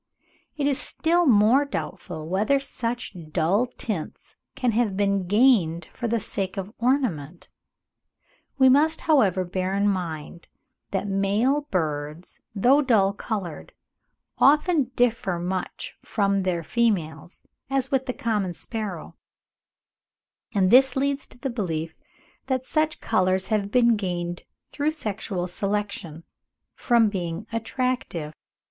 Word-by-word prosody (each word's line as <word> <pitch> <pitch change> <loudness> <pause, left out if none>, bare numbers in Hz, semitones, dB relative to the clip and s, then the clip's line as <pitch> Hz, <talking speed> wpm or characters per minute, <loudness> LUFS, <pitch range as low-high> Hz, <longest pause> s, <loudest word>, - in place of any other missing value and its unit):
It 290 - 0
is 280 -2 +1
still 340 +1 +1
more 230 +4 +5
doubtful 175 - -5
whether 210 +10 +2
such 245 -5 -4 0.2
dull 185 +9 +2
tints 215 -8 -6 0.2
can 250 -2 +1
have 220 -4 0
been 200 -2 +1
gained 190 -7 +3
for 240 - -3
the 230 0 +1
sake 195 -1 -4
of 195 +2 -5
ornament. 215 - -1 1.1
We 265 -1 +6
must, 300 +5 +4
however, 200 - +3
bear 185 +2 -2
in 200 +1 +2
mind 170 -4 -3 0.4
that 195 0 -2
male 210 +9 +1
birds, 155 -1 -3 0.2
though 255 +8 +4
dull 210 -8 +3
coloured, 195 -7 -5 0.7
often 300 +1 +4
differ 230 -7 +1
much 180 +1 -4
from 200 -2 0
their 180 -3 -1
females 175 -7 -1 0.2
(as 270 0 -1
with 265 0 +1
the 255 - -1
common 210 -7 -1
sparrow), 205 -3 -5 1.4
and 190 -1 +3
this 260 +1 +6
leads 275 +1 -1
to - - -17
the 255 +2 -3
belief 165 -8 -3 0.5
that 260 -1 -1
such 310 +1 0
colours 185 -3 +1
have 210 -2 0
been 235 0 +4
gained 175 -3 -4 0.3
through 290 +2 0
sexual 210 - -3
selection, 195 -4 -3 0.5
from 235 -2 +3
being 180 -1 -4
attractive. 230 - -2
205 Hz, 125 wpm, -25 LUFS, 180-255 Hz, 1.4 s, We